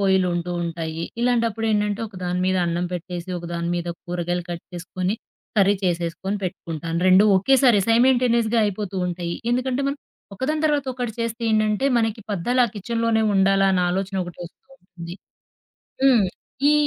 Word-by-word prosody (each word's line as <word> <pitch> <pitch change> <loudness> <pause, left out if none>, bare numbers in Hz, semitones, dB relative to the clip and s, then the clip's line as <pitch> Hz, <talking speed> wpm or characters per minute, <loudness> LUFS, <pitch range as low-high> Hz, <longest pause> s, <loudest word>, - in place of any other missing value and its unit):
పొయిలుంటూ 180 -3 +1
ఉంటాయి. 165 -1 -4 0.2
ఇలాంటప్పుడేండంటే 225 -3 +1
ఒకదాని 180 -2 -3
మీద 185 0 +2
అన్నం 170 +1 -1
పెట్టేసి, 175 0 -6
ఒకదాని 170 0 -4
మీద 175 0 -3 0.2
కూరగాయలు 175 0 -2
కట్ 170 -1 -6
చేసుకొని, 185 +2 -3 0.4
కర్రీ 200 0 +5
చేసేసుకొని, 175 +3 -1
పెట్టుకుంటాను. 165 -2 -4
రెండూ 185 +3 +7
ఒకేసారి 245 +2 +4
సైమంటేనియస్‌గా 235 -1 +3
అయిపోతూ 205 -1 -3
ఉంటాయి. 175 -1 -3 0.2
ఎందుకంటే 255 +1 0
మనం 280 - -2 0.4
ఒకదాని 300 +8 -1
తర్వాత 290 -3 +1
ఒకటి 245 -3 -3
చేస్తే 230 +1 -3
ఏండంటే, 215 +3 +2
మనకి 225 -1 -1
పద్దాలా 245 +7 +1
ఆ - - -16
కిచెన్‌‌లోనే 230 +1 0
ఉండాలా 195 0 +4
అని 180 -1 +2
ఆలోచన 195 +1 -2
ఒకటి 175 -1 -10
వస్తూ 170 - -14 0.2
ఉంటుంది. 175 -1 -9 0.9
హ్మ్. 240 -7 +5 0.4
ఈ - - +5
195 Hz, 140 wpm, -23 LUFS, 175-230 Hz, 0.9 s, రెండూ